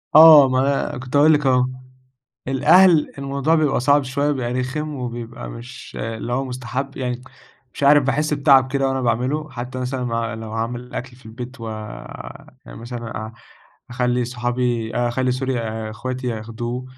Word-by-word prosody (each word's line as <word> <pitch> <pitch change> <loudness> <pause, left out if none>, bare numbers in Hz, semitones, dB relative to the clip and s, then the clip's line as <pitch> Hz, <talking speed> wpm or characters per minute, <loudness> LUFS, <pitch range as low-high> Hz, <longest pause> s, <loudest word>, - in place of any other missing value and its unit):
آه 155 -4 +10
ما 135 +2 0
كنت 130 +2 -6
هاقول 150 +2 +6
لِك 150 -1 +1
أهو، 125 -1 +4 0.8
الأهل 165 +4 +5
الموضوع 140 +3 0
بيبقى 150 -5 +2
صعب 140 +3 +4
شوية 140 +3 0
بيبقى 125 -4 -2
رخم 140 +5 -3
وبيبقى 120 -2 -6
مش 120 +3 -10
اللي 115 +1 -4
هو 135 +2 0
مستحب، 130 +2 -5
يعني 125 -1 -3 0.5
مش - - -8
عارف 145 +1 +6
باحس 150 +3 +1
بتعب 135 -2 +4
كده 135 -1 +1
وأنا 135 0 -1
باعمله، 130 +6 -1
حتّى 125 0 -6
مثلًا 125 0 -3 0.3
ب - - -8
لو 110 -1 -7
هاعمل 120 +2 -4
أكل 125 0 -6
في 125 -2 -17
البيت 120 +3 -9
ويعني 110 -1 -9
مثلًا 120 0 -7
أ 110 - -10 0.6
أخلّي 125 0 0
صحابي 120 -1 -2
أخلّي 120 +1 0
sorry 130 +1 -2
آآ 110 -1 -4
إخواتي 130 +3 -5
ياخدوه 120 +2 -4
125 Hz, 155 wpm, -21 LUFS, 120-140 Hz, 0.8 s, آه